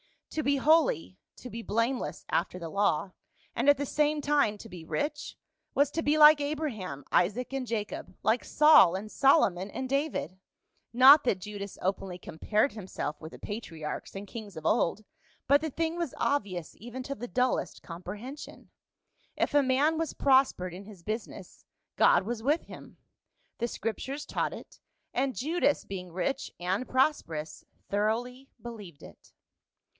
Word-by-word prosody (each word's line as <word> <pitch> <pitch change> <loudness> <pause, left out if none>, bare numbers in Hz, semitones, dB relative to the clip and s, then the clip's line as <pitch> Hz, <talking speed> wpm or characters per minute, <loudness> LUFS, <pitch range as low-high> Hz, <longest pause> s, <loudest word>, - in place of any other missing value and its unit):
To 310 - -1
be 280 -1 +2
holy, 270 - +2 0.2
to 250 - -10
be 230 - -5
blameless 230 +4 -2
after 180 +1 0
the 170 -2 -6
law, 200 -1 +1 0.4
and 245 +5 +2
at 285 - +7
the 285 - -2
same 300 +2 +1
time 285 -7 +2
to 225 - -10
be 175 -3 -9
rich, 295 - -3 0.4
was 285 0 +3
to 325 - -1
be 300 0 +2
like 300 -1 +8
Abraham, 260 - -3
Isaac 210 +9 +1
and 265 -2 -3
Jacob, 215 -2 -4
like 225 +3 +2
Saul 300 - +6
and 210 +3 -6
Solomon 205 - +3
and 260 +5 -4
David; 275 - -2 0.5
not 270 +5 +8
that 200 -6 +1
Judas 200 0 -7
openly 190 -1 -2
compared 210 - 0
himself 190 -7 -5
with 160 0 -9
the - - -9
patri 205 -7 -7
archs 150 - -5
and 195 +1 -6
kings 205 -2 -9
of 160 -1 -8
old, 190 +7 +1 0.4
but 285 +1 +6
the 315 - -2
thing 325 +3 -2
was 340 -6 -3
obvious 190 - -1
even 240 +4 -7
to 275 - -4
the 245 -2 -7
dullest 250 +1 -1
comprehension; 205 - -9 0.6
if - - -1
a 290 - +6
man 280 +5 +2
was 325 -2 -2
pros 265 -1 +4
pered 180 -1 -6
in 190 +3 -9
his 195 -5 -13
business, 215 +4 -6 0.3
God - - +5
was 225 +2 -4
with 290 +7 +1
him. - - -12 0.6
The 235 - 0
Scrip 225 -1 -3
tures 280 +3 -5
taught - - -2
it; - - -11 0.3
and 265 0 0
Judas, 300 +1 +1
being 185 -2 -7
rich 270 +11 -2
and 185 +8 -1
prosperous, 170 - -1 0.2
thoroughly 240 +6 -1
believed 210 -10 -10
it. - - -15
235 Hz, 165 wpm, -29 LUFS, 190-280 Hz, 0.6 s, like